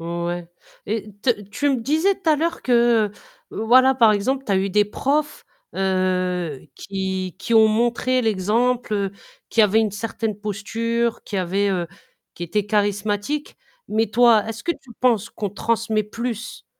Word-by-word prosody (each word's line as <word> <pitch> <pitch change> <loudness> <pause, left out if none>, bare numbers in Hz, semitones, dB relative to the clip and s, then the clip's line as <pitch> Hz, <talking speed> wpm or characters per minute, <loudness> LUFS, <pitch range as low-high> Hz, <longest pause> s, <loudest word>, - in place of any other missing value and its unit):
Ouais 170 +1 -4 0.4
et 210 0 -3
te 255 - +3
tu 205 -3 -4
tu 285 +6 0
me 265 - +2
disais 320 - +1
tout 365 -4 -3
à 310 - +6
l'heure 335 +3 -2
que 235 -4 +3 0.4
voilà, 255 +4 +4
par 230 -4 +5
exemple, 260 +7 -1
tu - - -5
as 195 - +3
eu 195 +1 +1
des 205 +2 +3
profs, 285 +8 -1 0.3
heu, 185 -5 -1
qui 190 -2 -4
qui 210 +4 -1
ont 220 -1 +7
montré 240 +3 +1
l'exemple, 215 -1 0 0.4
qui 225 - +4
avaient 210 +1 +4
une 215 -3 0
certaine 220 0 -3
posture, 225 +3 -2
qui 205 - -5
avaient 190 +2 0
heu, 175 -2 -1 0.5
qui 175 - -9
étaient 205 +4 -1
charismatiques. 205 +6 -1 0.3
Mais 220 +1 +1
toi, 230 -3 +5
est-ce 225 +1 -6
que 340 - +1
tu 255 - -17
penses 230 -4 +2
qu'on 205 -2 -4
transmet 220 +1 0
plus 235 +2 -6
215 Hz, 160 wpm, -22 LUFS, 195-240 Hz, 0.5 s, ont